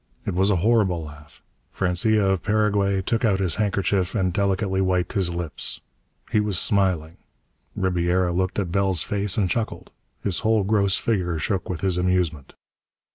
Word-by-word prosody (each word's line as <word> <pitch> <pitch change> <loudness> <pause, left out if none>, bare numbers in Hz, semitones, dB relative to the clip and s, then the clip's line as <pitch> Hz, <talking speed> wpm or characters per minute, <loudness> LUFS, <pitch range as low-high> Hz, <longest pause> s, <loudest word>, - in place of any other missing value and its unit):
It - - -2
was 95 +3 +2
a 105 - +3
horrible 100 -8 +2
laugh. 75 -1 -13 0.3
Francia 100 +3 +1
of 95 -2 +1
Paraguay 105 -2 +1
took 115 +4 -1
out 100 -4 +2
his 95 -4 +1
handkerchief 100 -2 0
and 95 -4 0
delicately 95 0 0
wiped 90 -2 0
his 95 -4 +1
lips. 85 -2 -3 0.5
He 110 - +3
was 105 -3 0
smiling. 90 -7 0 0.6
Ribiera 90 -1 +1
looked 95 +1 -1
at 95 -5 -2
Bell's 95 -2 +1
face 100 0 -2
and 100 -3 +2
chuckled. 110 +5 -3 0.3
His 95 -4 -1
whole 110 -2 +2
gross 100 -1 +2
figure 90 -7 -1
shook 95 +4 -2
with 85 -4 -4
his 95 -2 +1
amusement. 90 -6 -1
95 Hz, 160 wpm, -23 LUFS, 90-100 Hz, 0.6 s, a